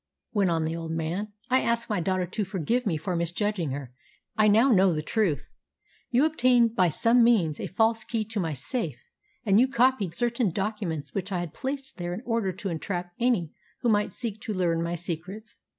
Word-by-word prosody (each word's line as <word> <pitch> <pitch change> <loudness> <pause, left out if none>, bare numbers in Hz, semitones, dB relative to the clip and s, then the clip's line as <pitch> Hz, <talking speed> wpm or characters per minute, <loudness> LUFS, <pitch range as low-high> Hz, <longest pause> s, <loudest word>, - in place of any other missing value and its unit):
went 200 -4 +2
on 165 -1 +1
the 160 +1 -2
old 165 -1 -5
man. 165 +6 -2 0.2
"I 260 - +5
ask 235 0 0
my 210 -4 0
daughter 185 +1 0
to 195 +4 -3
forgive 210 +5 -1
me 165 -5 +1
for 180 +4 -3
misjudging 175 +1 -1
her. 135 -2 -6 0.4
I 215 0 +4
now 225 +6 +5
know 190 -4 +5
the 155 -1 -2
truth. 190 -5 0 0.7
You 255 +4 +4
obtained 245 -7 +3
by 180 -4 +4
some 230 +9 +4
means 190 -11 +3
a - - -3
false 225 +2 +1
key 225 -1 -2
to 220 0 -4
my 165 -4 -1
safe, 140 - -2 0.5
and 200 0 +5
you 255 - +5
copied 250 -8 +2
certain 240 0 +1
documents 195 -5 -3
which 195 0 -3
I 185 - 0
had 175 -3 -4
placed 270 0 -5
there 175 -1 -3
in 225 - -8
order 230 -5 0
to 190 +2 -5
entrap 175 +1 -4
any 230 -10 +1 0.3
who 240 - +2
might 210 -1 +2
seek 220 -4 -5
to 215 - -4
learn 170 -3 +1
my 170 +1 -2
secrets. 180 +6 -6
200 Hz, 200 wpm, -27 LUFS, 170-230 Hz, 0.7 s, I